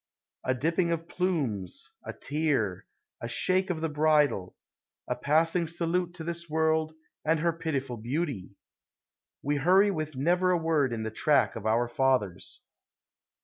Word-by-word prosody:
A 130 Hz, -, +1 dB
dipping 165 Hz, +6 st, +1 dB
of 165 Hz, 0 st, -2 dB
plumes, 145 Hz, -, -2 dB
a -, -, -5 dB
tear, 145 Hz, -, -1 dB, 0.3 s
a 120 Hz, -, -3 dB
shake 185 Hz, -, +1 dB
of 165 Hz, -3 st, -2 dB
the 160 Hz, -, +1 dB
bridle, 150 Hz, -, +2 dB, 0.5 s
A -, -, -1 dB
passing 165 Hz, +3 st, +1 dB
salute 175 Hz, +2 st, -1 dB
to 165 Hz, -, -6 dB
this 170 Hz, 0 st, -5 dB
world, 160 Hz, 0 st, +1 dB, 0.3 s
and 160 Hz, +1 st, +2 dB
her 170 Hz, +1 st, +1 dB
pitiful 140 Hz, -7 st, -3 dB
beauty! 125 Hz, -, -3 dB, 0.9 s
We 145 Hz, +1 st, 0 dB
hurry 190 Hz, +7 st, +4 dB
with 155 Hz, -5 st, -4 dB
never 175 Hz, +7 st, +2 dB
a 180 Hz, -, +3 dB
word 160 Hz, -5 st, +1 dB
in 115 Hz, -1 st, -3 dB
the 110 Hz, -, -3 dB
track 130 Hz, -3 st, +2 dB
of 110 Hz, -1 st, -4 dB
our 115 Hz, +2 st, +2 dB
fathers. 120 Hz, -7 st, -1 dB
155 Hz, 145 wpm, -28 LUFS, 130-170 Hz, 0.9 s, hurry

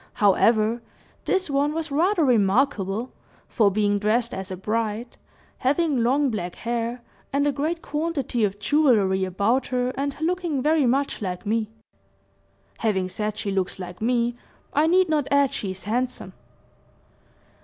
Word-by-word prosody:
However, 220 Hz, +3 st, +3 dB, 0.4 s
this 380 Hz, -1 st, +1 dB
one 285 Hz, +1 st, +1 dB
was 320 Hz, -2 st, -3 dB
rather 340 Hz, +3 st, +2 dB
remarkable, 225 Hz, -1 st, +1 dB, 0.4 s
for 215 Hz, -4 st, +3 dB
being 205 Hz, 0 st, +1 dB
dressed 230 Hz, +4 st, +1 dB
as 190 Hz, +1 st, -5 dB
a 185 Hz, -, -5 dB
bride, 220 Hz, +3 st, -2 dB, 0.4 s
having 285 Hz, 0 st, +1 dB
long 265 Hz, +3 st, +2 dB
black 180 Hz, -5 st, -4 dB
hair, 235 Hz, +1 st, -3 dB, 0.3 s
and 280 Hz, +1 st, +1 dB
a 290 Hz, -, +3 dB
great 310 Hz, +5 st, -2 dB
quantity 295 Hz, -6 st, -2 dB
of 200 Hz, -1 st, 0 dB
jewelry 205 Hz, -6 st, +3 dB
about 205 Hz, +8 st, 0 dB
her, 250 Hz, 0 st, -1 dB
and 280 Hz, +1 st, -3 dB
looking 340 Hz, -2 st, -1 dB
very 300 Hz, 0 st, +2 dB
much 275 Hz, +1 st, 0 dB
like 180 Hz, -2 st, -4 dB
me. 215 Hz, +1 st, 0 dB, 1.1 s
Having 190 Hz, -5 st, 0 dB
said 210 Hz, +2 st, -3 dB
she 200 Hz, -, -2 dB
looks 190 Hz, -1 st, -1 dB
like 180 Hz, 0 st, -8 dB
me, 240 Hz, +1 st, +1 dB, 0.4 s
I 300 Hz, +2 st, +3 dB
need 365 Hz, +2 st, +4 dB
not 300 Hz, -3 st, 0 dB
add 280 Hz, -1 st, +3 dB
she 200 Hz, -, -3 dB
is 190 Hz, -1 st, -7 dB
handsome." 245 Hz, +4 st, -2 dB
240 Hz, 145 wpm, -24 LUFS, 205-285 Hz, 1.1 s, need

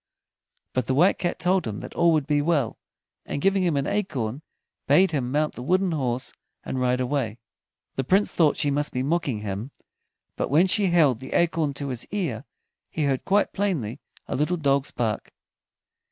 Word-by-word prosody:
But 130 Hz, -, -1 dB
the 130 Hz, -, +1 dB
White 175 Hz, +7 st, +4 dB
Cat 175 Hz, -, -1 dB
told 180 Hz, -2 st, +1 dB
him 105 Hz, -2 st, -4 dB
that -, -, -8 dB
all 170 Hz, 0 st, +4 dB
would 155 Hz, -3 st, +1 dB
be 145 Hz, 0 st, +2 dB
well, 145 Hz, -7 st, 0 dB, 0.4 s
and -, -, -4 dB
giving 195 Hz, +4 st, +2 dB
him 170 Hz, -5 st, +1 dB
an 140 Hz, -, 0 dB
acorn, 140 Hz, -, -2 dB, 0.5 s
bade 190 Hz, 0 st, +5 dB
him 130 Hz, -5 st, -1 dB
mount 150 Hz, +2 st, +1 dB
the -, -, -8 dB
wooden 185 Hz, +7 st, +1 dB
horse 130 Hz, -5 st, -2 dB, 0.3 s
and 130 Hz, -, -3 dB
ride 125 Hz, 0 st, +2 dB
away. 125 Hz, -4 st, -1 dB, 0.6 s
The 135 Hz, -, +1 dB
Prince 195 Hz, +9 st, +2 dB
thought 155 Hz, -4 st, +3 dB
she 145 Hz, -, +1 dB
must 145 Hz, +1 st, -1 dB
be 125 Hz, -, -1 dB
mocking 140 Hz, -7 st, 0 dB
him, 105 Hz, +4 st, -4 dB, 0.7 s
but -, -, -2 dB
when 155 Hz, +7 st, +5 dB
she 195 Hz, +1 st, +2 dB
held 155 Hz, -9 st, +4 dB
the 130 Hz, -, -8 dB
acorn 160 Hz, -4 st, +1 dB
to 140 Hz, -1 st, -4 dB
his 125 Hz, -3 st, -4 dB
ear, 155 Hz, -, -3 dB, 0.4 s
he 155 Hz, -, -2 dB
heard 135 Hz, -2 st, 0 dB
quite 200 Hz, +1 st, +2 dB
plainly 150 Hz, -, -1 dB, 0.3 s
a -, -, -3 dB
little 155 Hz, +6 st, 0 dB
dog's 140 Hz, -3 st, +1 dB
bark. 115 Hz, -4 st, -2 dB
145 Hz, 185 wpm, -25 LUFS, 125-175 Hz, 0.7 s, bade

